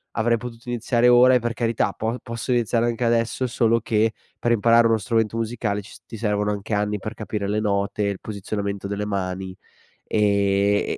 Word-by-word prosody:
avrei 115 Hz, +2 st, +2 dB
potuto 115 Hz, 0 st, -9 dB
iniziare 120 Hz, 0 st, +1 dB
ora 125 Hz, +1 st, +7 dB
e -, -, +4 dB
per 120 Hz, 0 st, -2 dB
carità 115 Hz, -2 st, 0 dB
po 115 Hz, +2 st, -2 dB
posso 115 Hz, +1 st, -4 dB
iniziare 120 Hz, -1 st, +1 dB
anche 120 Hz, +1 st, -1 dB
adesso, 115 Hz, +2 st, +1 dB
solo 115 Hz, 0 st, +2 dB
che 110 Hz, 0 st, +1 dB, 0.3 s
per 120 Hz, -, 0 dB
imparare 115 Hz, +1 st, +5 dB
uno 115 Hz, -1 st, +3 dB
strumento 115 Hz, -1 st, 0 dB
musicale, 110 Hz, -2 st, -2 dB
ci 100 Hz, -, -14 dB
s -, -, -15 dB
ti 115 Hz, -, -9 dB
servono 105 Hz, -1 st, 0 dB
anche 105 Hz, +1 st, -4 dB
anni, 105 Hz, 0 st, 0 dB
per 110 Hz, +3 st, -6 dB
capire 105 Hz, -2 st, -4 dB
le 105 Hz, +1 st, 0 dB
note 100 Hz, 0 st, 0 dB
e -, -, +1 dB
il 95 Hz, -, -7 dB
posizionamento 100 Hz, -1 st, -4 dB
delle 100 Hz, +1 st, -2 dB
mani 95 Hz, -2 st, -3 dB, 0.5 s
e 100 Hz, -1 st, +1 dB
110 Hz, 190 wpm, -23 LUFS, 100-115 Hz, 0.5 s, ora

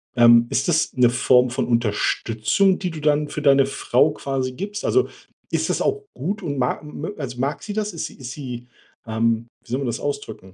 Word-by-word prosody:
Ähm, 120 Hz, 0 st, +7 dB
ist -, -, 0 dB
das 160 Hz, -2 st, +1 dB
'ne 125 Hz, -2 st, +4 dB
Form 125 Hz, +1 st, +4 dB
von 130 Hz, +2 st, -1 dB
Unterstützung, 115 Hz, -, +1 dB
die 180 Hz, -, -2 dB
du 160 Hz, -, -7 dB
dann 150 Hz, 0 st, +2 dB
für 150 Hz, -, -4 dB
deine 140 Hz, -2 st, +5 dB
Frau 140 Hz, +2 st, +2 dB
quasi 135 Hz, -3 st, -3 dB
gibst? 205 Hz, +8 st, -5 dB
Also, 390 Hz, -, +2 dB, 0.4 s
ist -, -, 0 dB
das -, -, 0 dB
auch 420 Hz, 0 st, 0 dB
gut 200 Hz, +9 st, -3 dB
und 145 Hz, -4 st, -3 dB
mag 125 Hz, +4 st, -1 dB
mö 150 Hz, +5 st, -6 dB
als 130 Hz, -4 st, -5 dB
mag 135 Hz, +4 st, -2 dB
sie 210 Hz, -, -5 dB
das? 210 Hz, 0 st, -2 dB
Ist 165 Hz, -, -4 dB
sie -, -, -14 dB
ist 125 Hz, -3 st, -7 dB
sie, 125 Hz, -3 st, -7 dB, 0.4 s
ähm 115 Hz, +1 st, 0 dB, 0.2 s
wie 120 Hz, -, -14 dB
soll 130 Hz, -, 0 dB
man 140 Hz, -, -2 dB
das 120 Hz, -1 st, -2 dB
ausdrücken? 110 Hz, -10 st, -5 dB
135 Hz, 210 wpm, -22 LUFS, 120-155 Hz, 0.4 s, Ähm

